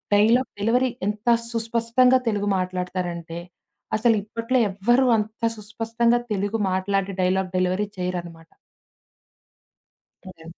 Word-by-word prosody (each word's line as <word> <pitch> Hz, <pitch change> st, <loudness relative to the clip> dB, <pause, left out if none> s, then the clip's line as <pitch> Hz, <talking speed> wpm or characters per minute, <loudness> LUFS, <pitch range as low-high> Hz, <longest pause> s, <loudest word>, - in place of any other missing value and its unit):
Dialogue 230 Hz, +5 st, +4 dB
delivery 245 Hz, +4 st, +2 dB, 0.2 s
ఎంత 210 Hz, +2 st, -4 dB, 0.2 s
సుస్పష్టంగా 230 Hz, +2 st, +2 dB
తెలుగు 205 Hz, -1 st, -1 dB
మాట్లాడతారంటే, 180 Hz, -2 st, -3 dB, 0.6 s
అసలిప్పట్లో 230 Hz, +2 st, +1 dB
ఎవ్వరు 240 Hz, +7 st, +2 dB
అంత 215 Hz, +1 st, -4 dB, 0.2 s
సుస్పష్టంగా 225 Hz, +3 st, 0 dB
తెలుగు 205 Hz, +2 st, -1 dB
మాట్లాడి 195 Hz, +1 st, 0 dB
డైలాగ్ 185 Hz, 0 st, +1 dB
డెలివరీ 185 Hz, +3 st, 0 dB
చేయరనమాట. 175 Hz, -2 st, -5 dB, 1.8 s
ఓకే. 165 Hz, -3 st, -13 dB
205 Hz, 90 wpm, -23 LUFS, 185-230 Hz, 1.8 s, డైలాగ్